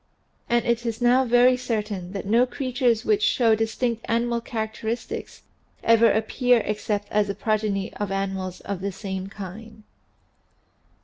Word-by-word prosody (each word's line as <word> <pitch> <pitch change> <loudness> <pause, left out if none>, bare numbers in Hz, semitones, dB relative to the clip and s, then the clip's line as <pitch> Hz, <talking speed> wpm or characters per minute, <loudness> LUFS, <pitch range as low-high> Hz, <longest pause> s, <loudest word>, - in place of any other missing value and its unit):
And 240 0 +2
it 235 0 +1
is 230 -2 -3
now 250 +2 +4
very 245 +1 +5
certain 215 -7 -3
that 195 - -5
no 235 +5 +3
creatures 250 -3 0
which 420 -1 +2
show 245 - +3
distinct 225 +1 -1
animal 235 0 +1
characteristics 220 0 -5 0.4
ever 230 0 +5
appear 235 +2 +2
except 210 -1 -2
as 210 -1 +2
the 200 - -3
progeny 210 -3 -1
of 205 -2 -4
animals 190 -2 -3
of 200 -2 -5
the 200 +1 -2
same 190 -1 -5
kind. 215 +3 -10
225 Hz, 140 wpm, -24 LUFS, 205-240 Hz, 0.4 s, very